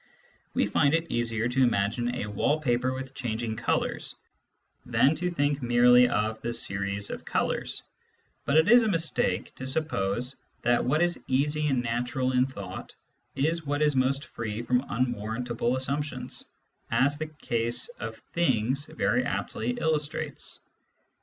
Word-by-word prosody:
We - - +3
find 145 +1 +3
it 165 0 -2
easier 115 -1 0
to 125 +2 +1
imagine 120 +1 +1
a 115 - -2
wall 105 +9 +1
paper 125 -3 +1
with 130 0 -6
changing 115 -3 -3
colours - - -1 0.7
than 140 - +3
to 180 +2 -1
think 145 -4 0
merely 125 0 +6
of 110 +1 -1
the 120 - -2
series 100 -2 -1
of - - -6
colours; - - -1 0.6
but 145 - +2
it 160 +2 +5
is 240 +3 +8
a 225 - +1
mistake 165 -5 0
to 130 - -5
suppose 125 -4 -1 0.3
that 120 0 +3
what 150 +6 +2
is 175 0 -1
easy 150 +3 +1
and 130 -4 +1
natural 125 +2 -1
in 125 0 +3
thought 100 -8 -8 0.4
is 160 +2 0
what 145 +1 +1
is 150 -2 +3
most 135 +2 +1
free 110 0 -5
from 125 +1 +2
un 125 +3 +1
warrantable 120 +3 -2
assumptions, 130 -1 -3 0.4
as 145 +2 +2
the 155 - -2
case 120 -6 0
of - - -5 0.2
"things" 135 -4 +1
very - - +1
aptly 120 +2 -2
illustrates. 155 -2 -2
130 Hz, 150 wpm, -28 LUFS, 120-145 Hz, 0.7 s, is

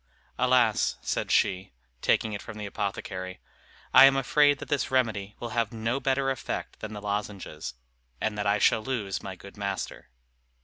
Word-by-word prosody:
"Alas!" 125 -3 +3
said - - -1
she, 95 -6 +1 0.3
taking 110 -1 +2
it 100 - -4
from 115 - -9
the 105 - -5
apothecary, 95 -2 -4 0.5
"I 135 - +11
am 135 0 +6
afraid 145 +2 +4
that - - -8
this 145 -2 0
remedy 110 -6 0
will 120 - -4
have 115 -2 0
no 115 +3 -1
better 135 0 +1
effect 130 - -4
than 110 0 -6
the 105 - -6
lozenges; 100 -9 -4 0.4
and 110 -1 -1
that 105 -1 -1
I 100 +1 +3
shall 110 - +4
lose 110 -5 -3
my 95 -1 -6
good 100 +2 -13
master." 100 -9 -4
105 Hz, 170 wpm, -28 LUFS, 100-125 Hz, 0.5 s, I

